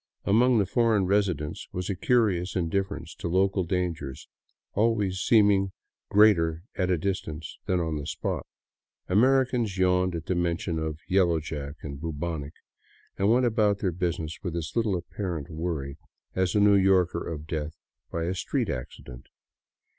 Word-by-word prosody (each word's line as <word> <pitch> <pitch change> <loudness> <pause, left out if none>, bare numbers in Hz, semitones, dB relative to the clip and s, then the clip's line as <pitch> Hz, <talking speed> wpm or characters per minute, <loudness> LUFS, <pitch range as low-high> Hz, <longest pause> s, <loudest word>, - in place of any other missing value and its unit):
Among 120 +4 +4
the 100 - +3
foreign 110 -1 +2
residents 90 -7 0
was 90 0 -4
a 100 - -1
curious 95 -4 +1
indifference 95 +2 -2
to - - -5
local 95 +2 +2
dangers, 85 -6 -3 0.5
always 105 -4 +1
seeming 100 -3 +4 0.4
greater 85 -6 +4
at 90 -1 -1
a 90 - +3
distance 80 -3 -4
than 90 -1 +2
on 80 -2 -1
the 70 - -5
spot. - - -3 0.6
Americans 125 -1 +2
yawned 90 -1 +2
at 80 -1 -5
the - - 0
mention 85 -2 -1
of 80 -1 -3
" - - -34
Yellow 90 -3 +3
Jack 75 -2 -6
" - - -28
and 70 -2 -6
Bubonic 80 -2 -4 0.7
and 100 +2 +3
went 125 +2 +4
about 110 -3 +2
their 95 -2 -1
business 85 -2 -3
with 85 -4 -4
as 80 -2 -3
little 110 -5 +1
apparent 85 -3 -5
worry 80 -3 -4 0.3
as 95 0 0
a - - +4
New 105 0 +6
Yorker 95 -2 +3
of 80 -2 -5
death 80 -1 -4 0.3
by 85 - -2
a 90 +2 -1
street 95 - -1
accident. - - -8
90 Hz, 160 wpm, -27 LUFS, 80-100 Hz, 0.7 s, New